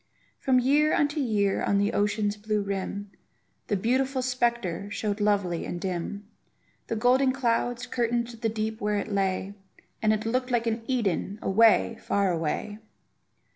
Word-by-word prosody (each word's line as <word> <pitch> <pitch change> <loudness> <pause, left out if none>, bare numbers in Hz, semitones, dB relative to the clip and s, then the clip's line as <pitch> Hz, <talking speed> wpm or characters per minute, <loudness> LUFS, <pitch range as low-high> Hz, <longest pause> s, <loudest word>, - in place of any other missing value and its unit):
From 260 -1 +2
year 290 +4 +3
unto 295 +1 +1
year 210 -7 +1
on 200 - +2
the 205 +2 +1
ocean's 205 0 +1
blue 210 0 -1
rim, 200 0 -4 0.6
The 205 - +1
beautiful 260 +5 0
spectre 235 -7 -1
showed 205 0 -2
lovely 200 -5 +1
and 175 - -4
dim; 190 +2 -4 0.6
The - - -2
golden 255 +4 +3
clouds 245 -1 0
curtained 240 -1 -1
the 230 -1 -3
deep 220 0 -3
where 210 0 0
it 205 - -3
lay, 195 0 -1 0.5
And 215 -1 +3
it 215 0 -1
looked 255 +3 0
like 240 -2 +1
an 225 0 -1
Eden, 205 -5 -1
away, 225 +2 +4
far 200 -2 +1
away! 170 +6 -2
215 Hz, 150 wpm, -27 LUFS, 200-240 Hz, 0.6 s, away